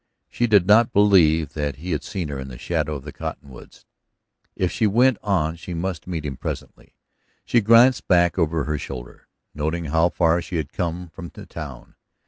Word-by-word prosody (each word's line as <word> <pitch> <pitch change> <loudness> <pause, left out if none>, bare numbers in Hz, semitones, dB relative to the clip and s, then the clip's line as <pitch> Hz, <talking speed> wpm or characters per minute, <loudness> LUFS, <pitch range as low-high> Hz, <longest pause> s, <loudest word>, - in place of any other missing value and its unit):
She 120 - 0
did 105 -5 +5
not 110 +4 +5
believe 80 -7 +4
that 75 -3 -2
he 85 +6 -6
had 75 - -1
seen 90 -6 -4
her 70 -2 -5
in 65 - -6
the 65 -2 -9
shadow 75 +1 -2
of 70 - -7
the 70 - -8
cottonwoods. 70 -2 -9 0.7
If 90 -1 0
she 110 - +1
went 120 +3 +3
on 85 -6 0
she 85 +1 -7
must 85 -1 -4
meet 80 -4 -4
him 70 -3 -4
presently. - - -7 0.5
She 120 - +3
glanced 115 +4 +5
back 85 -1 +3
over 80 -2 +1
her 75 0 -2
shoulder, 65 -3 -9 0.3
noting 80 +3 -2
how 80 +3 +2
far 85 0 +2
she 85 - -7
had 80 -4 -3
come 90 0 -3
from 85 +2 -9
the - - -11
town. 70 -7 -9
85 Hz, 190 wpm, -22 LUFS, 75-95 Hz, 0.7 s, did